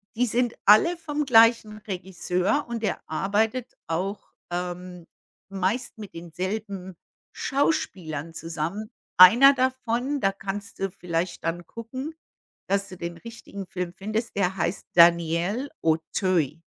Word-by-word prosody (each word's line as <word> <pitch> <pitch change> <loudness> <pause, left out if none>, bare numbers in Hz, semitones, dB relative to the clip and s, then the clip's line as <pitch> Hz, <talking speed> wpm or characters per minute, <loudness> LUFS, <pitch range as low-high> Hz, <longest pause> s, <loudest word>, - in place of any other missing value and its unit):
die 245 +2 +2
sind 240 +1 +1
alle 215 - +6
vom 300 -3 -3
gleichen 230 -3 +5
Regisseur 190 - -1
und 235 -1 -4
der - - -1
arbeitet 215 +9 -1
auch, 185 +5 -2 0.3
ähm, 180 0 -5 0.4
meist 195 +6 -2
mit 205 -3 -9
denselben 185 +2 -5 0.4
Schauspielern 185 - -1
zusammen. 165 +6 -4 0.3
Einer 235 +10 +9
davon, 260 +1 -1
da 195 - +3
kannst 200 +2 -6
du 195 - -1
vielleicht 180 -1 -3
dann 165 +1 -3
gucken, 260 +7 -7 0.5
dass 200 0 0
du 185 - -10
den 170 -1 -5
richtigen 225 -3 -9
Film 180 -1 -4
findest. 215 +4 -3
Der 195 -1 +1
heißt 175 +1 -2
Daniel 170 - +4
Auteuil. 160 -1 0
195 Hz, 120 wpm, -25 LUFS, 175-230 Hz, 0.5 s, Einer